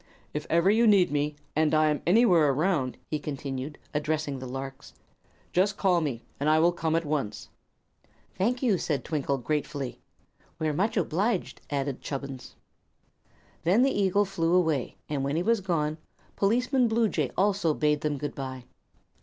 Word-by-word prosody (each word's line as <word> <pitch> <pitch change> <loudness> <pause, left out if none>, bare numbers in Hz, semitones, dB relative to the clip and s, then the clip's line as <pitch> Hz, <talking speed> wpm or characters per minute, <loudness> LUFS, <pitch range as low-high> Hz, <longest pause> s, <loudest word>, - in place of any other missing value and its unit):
"If 150 0 -4
ever 170 +4 +4
you 230 +2 +4
need 195 -6 +5
me, 145 +1 0 0.2
and 155 0 +3
I 155 0 +4
am 150 - -2
anywhere 180 -6 +5
around," 145 -2 0
he 155 - 0
continued, 140 -1 -5 0.2
addressing 150 -2 -1
the 130 - -6
larks, 135 +1 -7 0.6
"just 195 +3 +2
call 180 -3 +3
me, 130 -7 -3 0.2
and 145 +2 +1
I 155 - +5
will 170 +2 +4
come 165 -2 -1
at 165 0 0
once." 145 -8 -3 0.8
"Thank 240 +8 0
you," 210 -8 +3
said 140 -6 -2
Twinkle, 140 -3 -1
gratefully. 140 0 -3 0.6
"We're 155 -2 -1
much 200 +9 0
obliged," 190 +3 0
added 140 -2 -2
Chubbins. 135 -2 -6 1.1
Then 190 +9 +4
the 270 - +3
eagle 200 0 +2
flew 175 -3 0
away, 160 -8 +1
and 145 -2 -2
when 140 +2 -1
he 170 - +1
was 230 +1 +2
gone 155 -4 -1 0.4
Policeman 245 +5 +2
Bluejay 220 - +1
also 190 -5 +2
bade 150 -1 +1
them 150 -1 -1
good 145 +1 -4
bye. 130 -2 -6
155 Hz, 160 wpm, -27 LUFS, 145-190 Hz, 1.1 s, need